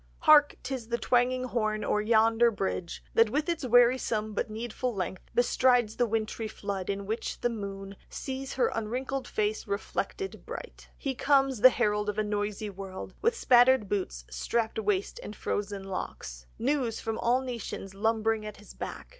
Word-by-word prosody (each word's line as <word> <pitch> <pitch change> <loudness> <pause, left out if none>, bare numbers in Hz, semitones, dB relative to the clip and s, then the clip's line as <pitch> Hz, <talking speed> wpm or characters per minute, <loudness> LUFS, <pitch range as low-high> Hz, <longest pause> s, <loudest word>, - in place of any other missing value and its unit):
"Hark! 305 -3 +6
'Tis 255 -4 -4
the 235 0 -1
twanging 250 +1 +2
horn! 215 -4 -1
O'er 210 - +1
yonder 225 +2 +4
bridge 190 -5 -3
That 225 -1 +5
with 295 +6 0
its 340 -3 -1
wearisome 240 -3 +3
but 205 - -2
needful 235 +2 -3
length 185 -1 -4
Bestrides 245 -2 +3
the 245 - +2
wintry 220 0 -2
flood, 200 -3 -5
in 200 0 -2
which 220 +3 -3
the 240 - +1
moon 195 -2 -6
Sees 265 0 -5
her 260 - +2
unwrinkled 260 +4 -3
face 215 0 -1
reflected 385 - -3
bright; - - -9
He 275 - -2
comes, 270 -3 +2
the 255 - +10
herald 210 -4 0
of 210 - -3
a 215 - +2
noisy 210 0 -2
world, 190 -1 -8
With 465 +2 +2
spattered 245 - +5
boots, 185 - -3
strapped 225 -1 -1
waist, 205 -2 -1
and 210 - -8
frozen 200 -1 -3
locks, - - -6
News 255 -3 0
from 225 0 -3
all 245 +2 +2
nations 235 -6 -6
lumbering 220 +1 +1
at 210 -1 -7
his 210 - -13
back. - - -7
225 Hz, 165 wpm, -29 LUFS, 205-250 Hz, -, the